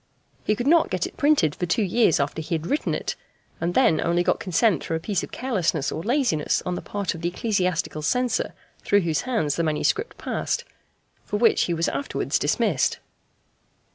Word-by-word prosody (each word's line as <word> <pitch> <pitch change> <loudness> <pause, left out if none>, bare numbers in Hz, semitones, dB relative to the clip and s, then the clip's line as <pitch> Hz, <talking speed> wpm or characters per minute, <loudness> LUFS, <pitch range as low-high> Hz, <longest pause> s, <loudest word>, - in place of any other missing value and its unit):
He 215 - +1
could 240 +3 -3
not 325 +3 +4
get - - -1
it - - -8
printed 285 - +3
for 175 - -3
two 215 - +1
years 200 -2 +3
after 140 +3 -1
he 165 +2 -2
had 160 0 -4
written 290 - 0
it, - - -3 0.4
and 170 +1 -2
then 230 -12 +4
only 170 +1 +1
got 180 - +1
consent 185 - +2
through 165 - -2
a - - -1
piece 190 +2 -1
of - - -8
carelessness 185 - -1
or 160 - -4
laziness 235 - +1
on 180 - -1
the - - -4
part 200 -3 -3
of 165 - -9
the 170 - 0
ecclesiastical 180 -6 -1
censor 245 +9 0 0.3
through 205 0 +3
whose 160 -3 0
hands 155 - 0
the 170 - +1
manuscript 160 - 0
passed 475 - -2 0.6
for 205 - -2
which 230 +1 +4
he 175 - -1
was 165 +1 0
afterwards 280 - -1
dismissed. - - +1
180 Hz, 195 wpm, -24 LUFS, 160-235 Hz, 0.6 s, not